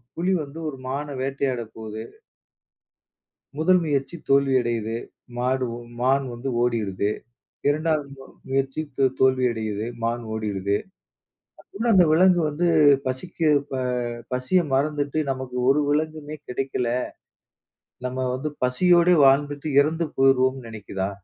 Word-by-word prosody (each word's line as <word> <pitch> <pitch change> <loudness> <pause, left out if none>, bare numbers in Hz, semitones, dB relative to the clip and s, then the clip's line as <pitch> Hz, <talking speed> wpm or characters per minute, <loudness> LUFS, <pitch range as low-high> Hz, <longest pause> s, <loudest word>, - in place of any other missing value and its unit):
புலி 180 +3 0
வந்து 140 +3 -10
ஒரு 140 - -5
மான 140 +3 -3
வேட்டையாட 135 -2 -1
போது. 110 -1 -7 1.6
முதல் 180 +3 +4
முயற்சி 145 +2 -1
தோல்வி 140 -1 +4
அடையுது. 115 -1 -2 0.4
மாடு, 130 +1 0
உம் 120 0 -12
மான் 135 +2 +2
வந்து 120 +3 -4
ஓடிறுது. 105 -4 0 0.6
2வது 155 -1 0
மொ 135 - -12 0.2
முயற்சி 135 +2 -1 0.2
தோ 135 - +4 0.2
தோல்வி 130 -1 +4
அடையுது. 110 -1 -3 0.2
மான் 120 +1 -1
ஓடிடுது. 100 -2 -1 0.8
அப்புட்ன்னா 225 +3 -2
அந்த 180 -2 +7
விலங்கு 180 +1 +5
வந்து 155 +4 -1 0.4
பசிக்கு 155 +5 -1 0.2
ப - - -4 0.6
பசிய 130 +9 +2
மறந்துட்டு 145 +2 0
நமக்கு 130 -1 -4
ஒரு 150 +2 +3
விலங்குமே 155 0 -2
கிடைக்கல. 125 -1 -2 1.2
நம்ம 130 0 -2
வந்து 145 +4 -3 0.2
பசியோடே 175 +6 +4
வாழ்ந்துட்டு 145 +2 +2
இறந்து 160 +2 0
போயிருவோம்ன்னு 130 -1 +3
நினைக்கிதா? 100 -3 -4
135 Hz, 120 wpm, -24 LUFS, 120-150 Hz, 1.6 s, அந்த